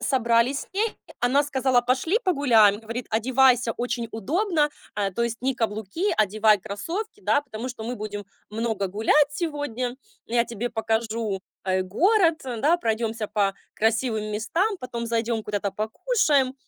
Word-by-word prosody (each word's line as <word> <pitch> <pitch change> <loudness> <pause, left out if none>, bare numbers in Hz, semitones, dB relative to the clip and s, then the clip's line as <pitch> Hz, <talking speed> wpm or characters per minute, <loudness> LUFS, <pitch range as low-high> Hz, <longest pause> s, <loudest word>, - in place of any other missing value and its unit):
собрались 245 +1 +2
с - - -10
ней, 425 +3 -1 0.2
она 265 +4 +3
сказала: 265 -3 +2
"Пошли 265 - +1
погуляем." 230 - +4
Говорит: 230 +2 -5
"Одевайся 245 +1 +3
очень 240 -1 -2
удобно, 305 - 0 0.2
а, 200 -1 0
то 235 - -2
есть 235 -1 -1
не 265 0 +1
каблуки, 220 - -2
одевай 215 +1 +4
кроссовки, 360 - -5
да, 290 - +2
потому 250 -2 -6
что 245 -3 -7
мы 245 - -3
будем 205 -1 -5 0.3
много 220 -2 -1
гулять 225 +9 +3
сегодня. 290 -6 -3 0.3
Я 235 0 +2
тебе 235 0 -4
покажу, 225 -2 -1 0.2
э, 185 -1 +1
город, 335 - +3
да, 265 +6 +1
пройдемся 225 -4 -1
по 200 -2 0 0.2
красивым 220 -1 0
местам, 350 - 0
потом 240 -2 -5
зайдём 230 -1 -1
куда-то 205 -1 -2
покушаем." 270 - +1
235 Hz, 145 wpm, -25 LUFS, 220-280 Hz, 0.3 s, погуляем